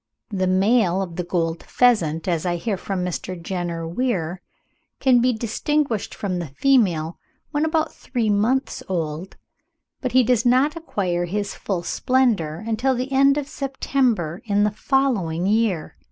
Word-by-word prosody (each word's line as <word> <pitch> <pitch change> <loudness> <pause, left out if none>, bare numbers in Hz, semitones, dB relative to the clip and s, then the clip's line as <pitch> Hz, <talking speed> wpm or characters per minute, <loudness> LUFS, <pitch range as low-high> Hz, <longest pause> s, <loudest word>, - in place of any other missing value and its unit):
The 190 -2 0
male 195 0 +3
of 175 -3 -7
the 180 - -2
Gold 165 -1 -1
pheasant, 175 -11 +2
as 170 -3 0
I 175 -1 0
hear 200 +5 -2
from 185 -1 -3
Mr. 180 0 -4
Jenner 170 -2 -3
Weir, 180 -4 -2 0.6
can 255 -2 +5
be 250 +1 +3
distinguished 235 +2 -1
from 185 -3 -2
the 170 - -4
female 170 - +1 0.3
when 300 0 +1
about 315 0 0
three 235 -5 -1
months 230 +6 +1
old, 165 0 -3 0.6
but 255 -2 -2
he 255 0 +6
does 240 -1 +2
not 260 +5 +3
acquire 185 - -2
his 200 +3 -3
full 185 -4 -3
splendour 215 - +1
until 235 +4 +1
the 255 +2 -3
end 275 +1 +4
of 290 - -1
the 285 - -16
September 255 - -1
in 205 -1 +2
the 210 - +2
following 210 - 0
year.) 205 -5 +1
205 Hz, 155 wpm, -22 LUFS, 175-255 Hz, 0.6 s, he